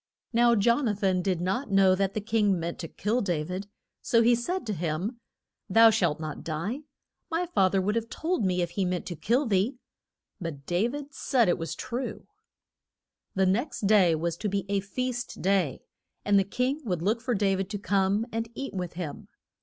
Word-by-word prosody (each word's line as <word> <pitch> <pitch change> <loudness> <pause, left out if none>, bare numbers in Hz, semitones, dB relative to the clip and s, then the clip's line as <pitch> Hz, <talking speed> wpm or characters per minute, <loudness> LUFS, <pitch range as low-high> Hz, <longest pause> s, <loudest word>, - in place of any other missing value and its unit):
Now 235 0 +5
Jon 235 +5 +3
a 210 - +1
than 190 -3 +1
did 185 -2 0
not 205 +9 -1
know 195 -1 +5
that 195 +1 0
the 215 - -1
king 205 -3 +2
meant 170 +1 -4
to 165 - -4
kill 215 +9 -1
Da 175 -6 0
vid, 185 +5 -5 0.3
so 230 -1 +3
he 240 +1 +5
said 330 +10 -1
to 215 - -2
him, 175 +7 -3 0.5
Thou 225 +3 +7
shalt 175 -9 +1
not 155 -2 -5
die. 170 - -3 0.5
My 335 +2 0
fath 195 - +2
er 190 - +3
would 205 +3 0
have 230 0 -2
told 330 -7 -1
me 180 -2 +1
if 170 - -4
he 195 - -1
meant 180 -1 -1
to 175 - -5
kill 240 - +1
thee. 215 +4 +1 0.6
But 155 -6 -6
Da 180 +6 +1
vid 285 +2 -6
said 250 -4 +2
it 175 - +2
was 165 -1 -4
true. 250 +2 -5 1.1
The 190 0 +3
next 235 +10 0
day 195 -5 +5
was 170 +1 -2
to 210 - -2
be 195 -1 -1
a 200 0 +1
feast 245 +5 -4
day, 185 -7 +1 0.4
and 205 -1 +5
the 195 - +1
king 255 +8 -1
would 180 -8 -2
look 220 +4 +1
for 245 0 0
Dav 195 -1 +1
id 195 0 -2
to 205 - -3
come 200 +2 +1
and 225 0 -3
eat 275 +2 -5
with 180 -3 -4
him. 170 -4 -6
200 Hz, 205 wpm, -28 LUFS, 180-235 Hz, 1.1 s, Thou